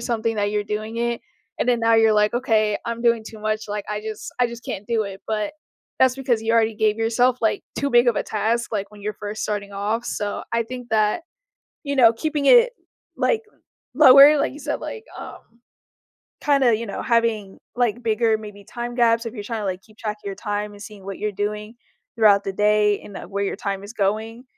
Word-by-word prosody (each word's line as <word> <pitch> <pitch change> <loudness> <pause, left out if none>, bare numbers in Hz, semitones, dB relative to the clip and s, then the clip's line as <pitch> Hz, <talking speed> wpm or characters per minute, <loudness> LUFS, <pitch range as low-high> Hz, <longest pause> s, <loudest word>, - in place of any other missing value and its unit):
something 230 -1 -1
that 205 0 0
you're 210 0 -1
doing 215 +2 -4
it. 235 0 -1 0.4
And - - -1
then 240 -1 +2
now 230 0 +4
you're 225 -1 +5
like, 210 +1 +2
"Okay. 220 -4 +1
I'm 235 0 -4
doing 230 -2 +2
too 220 - -10
much. 215 0 -2
Like, 205 -1 -4
I 210 0 -3
just 215 0 -7
I 245 - +5
just 235 0 -10
can't 200 +2 -5
do 230 -2 +1
it." 195 0 -8
But 215 +5 -2 0.4
that's 260 -1 +4
because 250 -4 0
you 225 +1 0
already 225 -1 +3
gave 215 0 +2
yourself, 240 +2 +2
like, 220 - +1 0.2
too 280 0 -1
big 240 +1 +5
of 235 - +3
a - - +1
task, 225 +3 -1
like, 200 -2 -2
when 205 -1 -14
you're 210 +1 -3
first 210 +1 -6
starting 205 -1 -3
off. 210 +4 -2
So 205 -3 -3
I 230 0 +2
think 245 0 -8
that, 215 +9 +1 0.6
you 280 0 -2
know, 230 -3 +7
keeping 295 +3 -2
it, - - +7 0.4
like, 455 -2 +1 0.5
lower, 280 +3 +8
like - - 0
you - - -10
said, 295 0 -3
like, 450 -1 -7
um, - - -8 1.0
kinda, 275 -6 +3
you 230 +1 -5
know, 200 - -5
having, 230 -5 0 0.2
like, 240 -1 0
bigger 225 0 +2
maybe 210 -2 -10
time 240 +3 -6
gaps, 230 -1 +3
if 230 - -6
you're 205 - -6
trying 225 0 -4
to, - - -4
like, 185 -1 -3
keep 215 -1 -22
track 215 -1 -3
of - - -15
your 195 - -3
time 210 -1 -3
and 205 - -14
seeing 205 -2 -11
what 195 -1 -6
you're 210 -1 -2
doing 210 +2 -4 0.4
throughout 205 -3 +5
the 195 - -3
day 210 0 +2
and, 200 - -11
uh, - - -8
where 200 +2 -3
your 195 - -2
time 195 -1 -4
is 205 +2 -9
going, 220 +4 -2
220 Hz, 220 wpm, -22 LUFS, 210-235 Hz, 1.0 s, lower